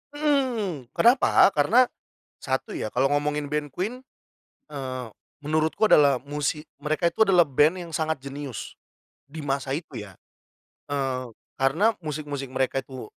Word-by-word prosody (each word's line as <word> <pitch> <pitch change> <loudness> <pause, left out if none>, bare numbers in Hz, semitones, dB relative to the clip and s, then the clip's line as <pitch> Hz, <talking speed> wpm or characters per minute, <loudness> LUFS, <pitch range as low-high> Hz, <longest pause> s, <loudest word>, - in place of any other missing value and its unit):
Hmm, 245 - 0
kenapa? 235 -4 +5
Karena 195 - +4 0.6
1 130 -1 -2
ya, 110 - -3
kalo 130 +2 +2
ngomongin 145 0 0
band 150 0 -2
Queen, 215 - -4 0.7
eee, 130 -3 -5 0.4
menurutku 155 +7 +1
adalah 140 -4 +5
musik 150 +2 -3
mereka 155 +4 0
itu 220 +6 +3
adalah 180 -4 +5
band 150 +6 +2
yang 170 - -8
sangat 160 -4 -1
jenius, 140 -3 -7 0.5
di 155 +1 -8
masa 135 0 -1
itu 150 -8 -7
ya. 100 -3 -11 0.7
Eee, 130 -3 -2 0.3
karena 175 +12 +3
musik-musik 145 -3 -5
mereka 130 0 0
itu 130 -2 -9
145 Hz, 130 wpm, -25 LUFS, 135-170 Hz, 0.7 s, kenapa